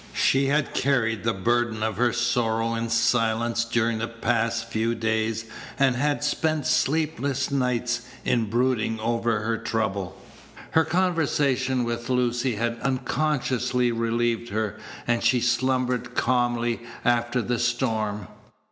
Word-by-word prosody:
She 135 +1 +3
had 145 +1 +1
carried 115 -5 +1
the 115 - +2
burden 115 +2 0
of 110 -1 -1
her 120 +1 +3
sorrow 115 -2 0
in 115 0 -2
silence 115 0 +1
during 115 -1 0
the 115 - -2
past 115 0 -1
few 115 +1 -1
days, 110 0 -1 0.3
and 135 -2 +3
had 145 +3 0
spent 155 0 0
sleepless 145 -3 0
nights 125 -2 0 0.2
in 115 -2 +2
brooding 115 -1 +1
over 115 -1 0
her 115 +1 -1
trouble. 100 -5 -2 0.5
Her 160 0 +4
conversation 150 -7 +1
with 120 +1 -3
Lucy 125 -1 +1
had 115 +2 -2
unconsciously 130 -1 0
relieved 115 0 0
her, 110 0 -2 0.3
and 120 -1 0
she 120 +2 +4
slumbered 125 +1 0
calmly 120 -1 +1 0.2
after 120 +1 +2
the 120 +1 -1
storm. 110 -4 -1
120 Hz, 130 wpm, -25 LUFS, 115-130 Hz, 0.5 s, Her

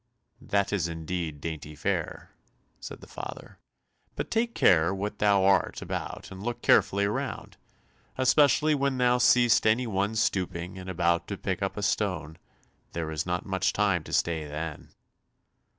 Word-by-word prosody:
"That 100 0 0
is 90 -5 0
indeed 80 -2 -4
dainty 75 -2 -6
fare," 75 - -3 0.5
said - - -9
the - - -12
father, - - -9 0.6
"but - - -4
take 230 +1 0
care 85 -1 +4
what 105 +2 -4
thou 100 -2 +4
art 95 0 +2
about - - -5
and 95 0 -9
look 120 +2 -4
carefully 100 +1 +4
around, 100 - -4 0.6
especially 145 +4 +4
when 140 -2 0
thou 125 0 +3
seest 120 -2 +4
any 115 +4 +3
one 100 0 -1
stooping 90 -3 -1
and 95 0 -8
about 85 -1 +1
to - - -4
pick - - -3
up - - -2
a - - -3
stone, 80 +2 -1 0.5
there 80 -2 -3
is 80 +2 -3
not 90 +2 -2
much 95 -1 0
time 100 -5 +1
to - - -9
stay 80 -3 0
then." 75 +1 -6
95 Hz, 155 wpm, -27 LUFS, 85-110 Hz, 0.6 s, care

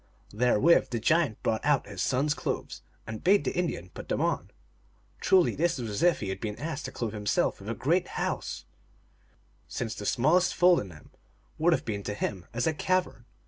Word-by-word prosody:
Therewith 125 +8 +4
the 120 - -2
giant 145 -1 +1
brought 110 - 0
out 145 -2 +2
his 100 -3 -6
son 130 +2 +1
s 150 - +2
clothes, - - -4 0.2
and 110 -1 -7
bade 200 +2 +4
the - - -2
Indian 165 - -2
put - - -10
them - - 0
on. - - -1 0.7
Truly 185 -2 +4
this 170 0 0
was 115 -4 -4
as 100 - -3
if 175 -1 +3
he 100 - -3
had 95 - -4
been 105 -2 -3
asked 155 +1 -5
to 135 - -5
clothe 115 -5 -4
himself 105 -1 0
with - - -8
a - - -2
great - - +1
house, - - -3 1.0
since 115 -3 -4
the 105 - -6
smallest 170 +8 +3
fold 180 0 +5
in 95 - -6
them 75 -3 -15 0.5
would 170 +3 +4
have - - -1
been 105 -3 -3
to 105 +1 -4
him 95 -4 -4
as 120 +2 -1
a 160 - +2
cavern. 180 - -1
125 Hz, 205 wpm, -28 LUFS, 105-165 Hz, 1.0 s, fold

